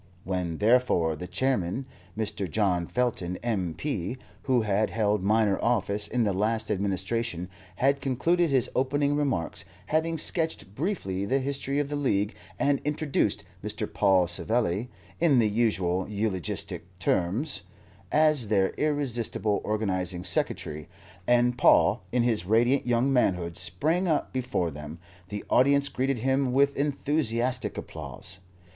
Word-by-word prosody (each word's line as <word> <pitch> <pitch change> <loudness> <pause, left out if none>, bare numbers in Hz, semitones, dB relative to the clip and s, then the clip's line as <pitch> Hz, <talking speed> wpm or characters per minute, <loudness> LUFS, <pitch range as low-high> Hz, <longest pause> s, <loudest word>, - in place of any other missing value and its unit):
When, 90 -3 -2
therefore, 105 -8 +3
the 90 +4 -7
Chairman, 125 +2 -1 0.3
Mr. 105 -4 -2
John 90 -3 +1
Felton, 110 -8 -1
M.P., 105 - -2 0.3
who 125 -4 +2
had 105 +1 +1
held 105 -2 +1
minor 105 0 +2
office 105 -3 +1
in 125 -2 0
the 100 -3 +1
last 110 +3 0
administration, 95 -1 -2 0.3
had 140 +6 +2
concluded 165 +6 +1
his 130 -3 +2
opening 140 +2 +1
remarks, 135 - -1 0.2
having 160 +4 0
sketched 160 - -2
briefly 105 - -2
the 130 +6 +1
history 140 0 -2
of 145 -1 +1
the 145 - -2
League 105 -7 0 0.2
and 140 -1 +1
introduced 150 -1 0 0.2
Mr. - - -2
Paul 95 -3 +3
Savelli, 110 +4 0 0.3
in 160 -6 +4
the 115 -3 +4
usual 100 -5 0
eulogistic 95 -3 -3
terms, 100 - 0 0.5
as 155 -6 +4
their 100 -2 +2
irresistible 120 -8 0
Organizing 95 -4 -1
Secretary, 75 -4 0 0.4
and 120 0 +3
Paul 100 +8 +5
in 125 -1 +2
his 115 -6 +1
radiant 120 +6 +3
young 120 +3 +2
manhood 90 -9 +1
sprang 160 - -1
up 155 -3 0
before 125 -10 -1
them, 75 +2 -8 0.3
the 105 +1 -5
audience 140 +2 +4
greeted 135 0 -1
him 130 +2 +1
with 140 +1 +3
enthusiastic 135 -4 0
applause. - - -7
115 Hz, 130 wpm, -27 LUFS, 95-135 Hz, 0.5 s, Paul